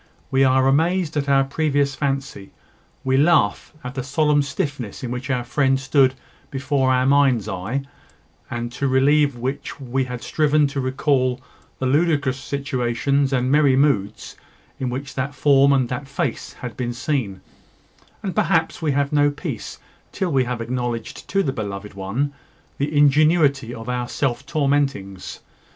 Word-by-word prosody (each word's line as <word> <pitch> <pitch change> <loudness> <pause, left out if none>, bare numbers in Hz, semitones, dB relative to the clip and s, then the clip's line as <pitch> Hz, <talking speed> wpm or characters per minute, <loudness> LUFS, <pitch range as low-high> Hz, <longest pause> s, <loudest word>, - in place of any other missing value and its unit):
We 135 0 +4
are 130 0 +4
amazed 165 +4 +1
at 140 -1 -1
our 135 -1 +5
previous 140 0 0
fancy 135 -7 -3 0.5
we 130 0 +2
laugh 145 -8 +3
at 125 +1 -6
the 135 - -3
solemn 145 +2 +2
stiffness 140 -5 -4
in 120 - -4
which 125 +3 -5
our 125 -3 0
friend 135 +2 +1
stood 135 -1 +3 0.3
before 135 -1 0
our 130 0 +2
mind's 135 -6 +3
eye, 110 +10 -3 0.7
and 120 0 -4
to 140 +3 -2
relieve 140 +1 +3
which 130 +5 -4
we 130 0 -1
had 125 -1 -6
striven 150 -1 +2
to 140 0 -4
recall 130 -1 +1 0.4
the 130 - -3
ludicrous 140 -2 +1
situations 140 0 -1
and 130 -1 +1
merry 145 -2 +4
moods, 135 -8 0 0.4
in 130 - -2
which 135 +3 -5
that 135 +2 -3
form 140 -1 +4
and 130 -3 +3
that 125 +2 -4
face 140 - -3
had 125 -2 -8
been 120 -1 -3
seen; 120 -7 -2 0.8
and 190 -3 -2
perhaps 160 +2 +1
we 150 -3 +1
have 140 +1 0
no 145 0 +4
peace 145 +1 -6 0.3
till 185 -3 -2
we 130 -3 +2
have 120 -1 -3
acknowledged 120 -1 -4
to 195 0 +2
the 135 - -1
beloved 105 -2 -5
one 105 +10 -2 0.5
the 145 +2 -1
ingenuity 145 -3 +4
of 115 -1 -8
our 125 -1 -2
self 130 -4 -2
tormentings. 135 - -1
135 Hz, 155 wpm, -22 LUFS, 125-145 Hz, 0.8 s, our